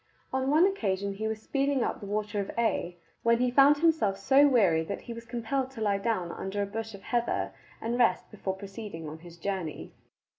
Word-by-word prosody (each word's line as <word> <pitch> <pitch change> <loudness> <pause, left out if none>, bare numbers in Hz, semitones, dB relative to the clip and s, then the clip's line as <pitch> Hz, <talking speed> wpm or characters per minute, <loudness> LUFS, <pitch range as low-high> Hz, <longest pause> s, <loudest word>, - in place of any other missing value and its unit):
On 265 0 +1
one 310 +5 +6
occasion 200 - 0
he 215 +2 -3
was 220 0 -3
speeding 275 -2 +1
up - - -2
the 205 - -8
Water 210 0 -2
of 200 - -3
Ć 225 -6 0 0.3
when 230 0 +4
he 250 +1 +1
found 280 +3 +6
himself 310 -11 +2
so 270 +8 +5
weary 195 - +4
that - - -5
he 235 - -7
was 230 0 -9
compelled 250 +3 -2
to 265 - -11
lie 200 -2 +1
down 195 -5 -1
under 200 +1 -3
a - - -1
bush 220 +1 -5
of 195 - -13
heather 100 - -1 0.3
and 235 +2 -2
rest 240 - +2
before 195 -2 -3
proceeding 195 -4 -7
on 155 +1 -7
his 170 0 -13
journey. 185 -3 -4
220 Hz, 210 wpm, -29 LUFS, 195-250 Hz, 0.3 s, one